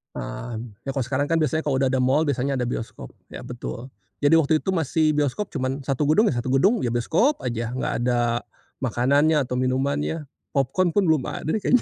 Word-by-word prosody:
Nah, 110 Hz, -, -5 dB, 0.2 s
ya, -, -, -4 dB
kalau 135 Hz, -, -1 dB
sekarang 135 Hz, +3 st, 0 dB
kan 165 Hz, +2 st, +1 dB
biasanya 155 Hz, +1 st, 0 dB
kalau 135 Hz, -2 st, +1 dB
udah 135 Hz, -, +3 dB
ada 130 Hz, -, +1 dB
mall, 130 Hz, +4 st, +3 dB
biasanya 140 Hz, -2 st, 0 dB
ada 125 Hz, -2 st, -1 dB
bioskop. 115 Hz, -, -6 dB, 0.2 s
Iya, -, -, -7 dB
betul, 120 Hz, +1 st, -7 dB, 0.3 s
jadi 150 Hz, +3 st, +5 dB
waktu 155 Hz, 0 st, +2 dB
itu -, -, -4 dB
masih 160 Hz, -3 st, +1 dB
bioskop 150 Hz, +8 st, 0 dB
cuman 135 Hz, 0 st, -2 dB
satu 135 Hz, +1 st, -1 dB
gedung 205 Hz, +9 st, +4 dB
ya, 120 Hz, -, -2 dB
satu 130 Hz, +2 st, -1 dB
gedung, 195 Hz, -, +3 dB
ya 120 Hz, -, -1 dB
bioskop 170 Hz, -, +1 dB
aja, 120 Hz, -1 st, -3 dB
nggak 130 Hz, -, -2 dB
ada 120 Hz, -1 st, +1 dB, 0.3 s
makanannya 140 Hz, +5 st, +2 dB
atau 125 Hz, -1 st, -3 dB
minumannya 140 Hz, +3 st, -1 dB, 0.2 s
popcorn 150 Hz, +6 st, +1 dB
pun 195 Hz, -5 st, +2 dB
belum 155 Hz, -5 st, +2 dB
ada -, -, -5 dB
deh 190 Hz, -, +2 dB
kayaknya. 250 Hz, +5 st, +3 dB
135 Hz, 205 wpm, -24 LUFS, 125-155 Hz, 0.3 s, jadi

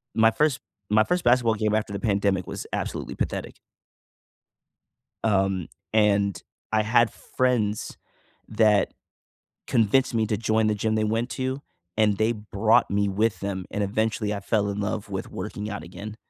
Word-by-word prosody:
my 115 Hz, 0 st, +5 dB
first 150 Hz, +2 st, +1 dB, 0.3 s
my 110 Hz, +1 st, +5 dB
first 180 Hz, -1 st, 0 dB
basketball 120 Hz, -2 st, +4 dB
game 110 Hz, 0 st, +1 dB
after 110 Hz, -1 st, -1 dB
the 100 Hz, -, -3 dB
pandemic 100 Hz, -3 st, 0 dB
was -, -, -6 dB
absolutely -, -, -3 dB
pathetic -, -, -3 dB, 1.7 s
Um, 95 Hz, -4 st, +1 dB, 0.3 s
and 100 Hz, -4 st, +2 dB, 0.3 s
I 110 Hz, -1 st, +3 dB
had 115 Hz, +1 st, +3 dB
friends 115 Hz, -5 st, -1 dB, 0.5 s
that 105 Hz, -2 st, +3 dB, 0.7 s
convinced 120 Hz, +4 st, +2 dB
me 110 Hz, -1 st, +2 dB
to 105 Hz, -2 st, 0 dB
join 110 Hz, 0 st, +1 dB
the 105 Hz, -, +1 dB
gym 110 Hz, +1 st, 0 dB
they 110 Hz, -, +1 dB
went 115 Hz, +3 st, 0 dB
to, 130 Hz, +3 st, -3 dB, 0.4 s
and 105 Hz, -2 st, +3 dB
they 110 Hz, +2 st, +2 dB
brought 110 Hz, 0 st, +2 dB
me 100 Hz, 0 st, +1 dB
with 105 Hz, +3 st, 0 dB
them, 95 Hz, -2 st, -4 dB
and 105 Hz, -, -1 dB
eventually, 110 Hz, +1 st, 0 dB
I 100 Hz, -, -3 dB
fell 100 Hz, 0 st, 0 dB
in 100 Hz, -, -3 dB
love 105 Hz, 0 st, -3 dB
with 95 Hz, -1 st, -4 dB
working 105 Hz, +2 st, -5 dB
out 105 Hz, -5 st, -5 dB
again. 100 Hz, +5 st, -8 dB
110 Hz, 160 wpm, -25 LUFS, 100-115 Hz, 1.7 s, my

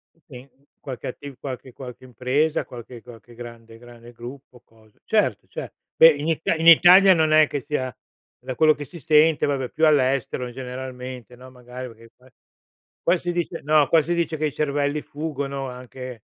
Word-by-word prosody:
Uhm, 165 Hz, -, -35 dB
sì, 130 Hz, -1 st, -12 dB, 0.3 s
qualche 130 Hz, -4 st, -8 dB
attiv 140 Hz, +1 st, -9 dB
qualche 130 Hz, -1 st, -8 dB
qualche 125 Hz, -1 st, -11 dB
impresa, 130 Hz, +6 st, -1 dB
qualche 120 Hz, -1 st, -11 dB
qualche 120 Hz, -1 st, -15 dB
grande 115 Hz, -1 st, -12 dB
grande 120 Hz, 0 st, -15 dB
gruppo, 125 Hz, +1 st, -12 dB
cosa 110 Hz, -2 st, -26 dB
certo, -, -, 0 dB
certo. -, -, -8 dB, 0.2 s
Beh 165 Hz, -, +9 dB
in 150 Hz, +1 st, -3 dB
It 160 Hz, 0 st, -1 dB
in 165 Hz, +1 st, -2 dB
Italia 185 Hz, +3 st, +8 dB
non 160 Hz, -2 st, +1 dB
è 155 Hz, -1 st, +6 dB
che 145 Hz, -, -4 dB
sia 130 Hz, -4 st, -4 dB, 0.5 s
da 130 Hz, -, -6 dB
quello 155 Hz, +1 st, +4 dB
che 145 Hz, -, -8 dB
si 155 Hz, +4 st, -12 dB
sente, 155 Hz, +2 st, +3 dB
vabbè 135 Hz, -3 st, -2 dB
più 160 Hz, -, 0 dB
all'estero, 130 Hz, -3 st, +1 dB
generalmente, 125 Hz, -1 st, -8 dB
no, 130 Hz, +1 st, -14 dB
magari 125 Hz, 0 st, -9 dB
perché 115 Hz, 0 st, -17 dB
qua- 130 Hz, +1 st, -22 dB, 0.7 s
qua 175 Hz, +2 st, +3 dB
si 175 Hz, +1 st, -3 dB
dice 175 Hz, -1 st, -3 dB
no, 150 Hz, -1 st, +3 dB
qua 165 Hz, -, +5 dB
si 175 Hz, +4 st, -2 dB
dice 165 Hz, -2 st, -1 dB
che 155 Hz, 0 st, -1 dB
i 145 Hz, -, -3 dB
cervelli 145 Hz, 0 st, -1 dB
fuggono 140 Hz, -3 st, -5 dB
anche 125 Hz, -2 st, -9 dB
130 Hz, 180 wpm, -23 LUFS, 125-155 Hz, 0.7 s, Beh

